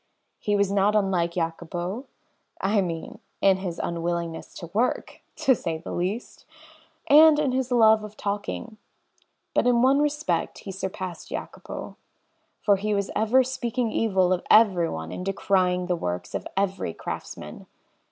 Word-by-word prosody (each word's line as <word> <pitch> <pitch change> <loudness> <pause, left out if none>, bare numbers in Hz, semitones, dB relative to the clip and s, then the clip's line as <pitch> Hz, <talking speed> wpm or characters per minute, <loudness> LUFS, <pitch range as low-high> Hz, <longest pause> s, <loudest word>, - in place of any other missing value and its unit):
He 205 -1 0
was 200 -1 +2
not 200 +1 +3
unlike 185 -5 +1
Jacopo 175 - -3 0.5
I 200 +1 +2
mean, 165 -3 -5 0.2
in 195 -1 +4
his 185 -3 -5
unwillingness 170 -1 -3
to 170 -1 -9
work 235 +5 -1
(to 265 - +3
say 165 -8 -3
the 160 - -8
least), 190 +7 -3 0.6
and 305 +1 +7
in 295 -3 +1
his 260 0 -1
love 220 -3 +5
of 210 0 -9
talking 205 +2 -4 0.8
but - - +2
in 240 -1 +4
one 270 +2 +5
respect 295 +1 -1
he 195 - -8
surpassed 185 -2 -5
Jacopo, - - -7 0.7
for 200 -2 +4
he 210 +2 -1
was 200 -1 -1
ever 235 +5 +4
speaking 245 -2 -2
evil 190 -5 +2
of 180 - -1
everyone 175 - +4
and - - -5
decrying 185 -2 +1
the 180 0 0
works 90 - -4
of - - -3
every 195 - -1
craftsman. - - -7
195 Hz, 145 wpm, -25 LUFS, 175-225 Hz, 0.8 s, and